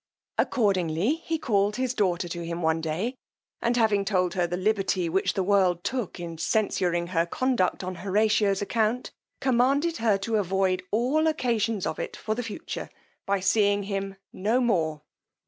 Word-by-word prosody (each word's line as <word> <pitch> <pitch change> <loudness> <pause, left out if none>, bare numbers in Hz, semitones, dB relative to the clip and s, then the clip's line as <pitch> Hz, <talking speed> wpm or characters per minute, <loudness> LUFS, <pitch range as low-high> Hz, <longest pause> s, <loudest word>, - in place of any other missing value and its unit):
Accordingly 190 - +2
he 330 - 0
called 210 -7 +1
his 255 -1 -1
daughter 185 -6 0
to 170 0 -5
him 170 +1 -4
one 160 0 +2
day, 165 +10 -2 0.5
and 235 +1 +1
having 215 -4 +3
told 185 -3 +1
her 180 -2 +1
the 175 +1 -3
liberty 190 -2 +1
which 190 +4 0
the 190 - +1
world 185 -3 +2
took 245 -8 -3
in 165 -2 -6
censuring 175 -2 +1
her 170 -2 +1
conduct 240 -4 0
on 185 0 -3
Horatio's 205 +1 +2
account, 225 +3 0 0.3
commanded 275 +6 +2
her 220 -3 +2
to 220 +3 -1
avoid 190 -1 +1
all 260 +10 +2
occasions 230 - 0
of - - -3
it - - -5
for 215 - -2
the 235 - -3
future, 230 +8 -6 0.4
by 200 -1 +1
seeing 200 +1 +3
him 195 -1 -3 0.2
no 215 +6 +1
more. 160 -11 0
200 Hz, 165 wpm, -26 LUFS, 180-230 Hz, 0.5 s, having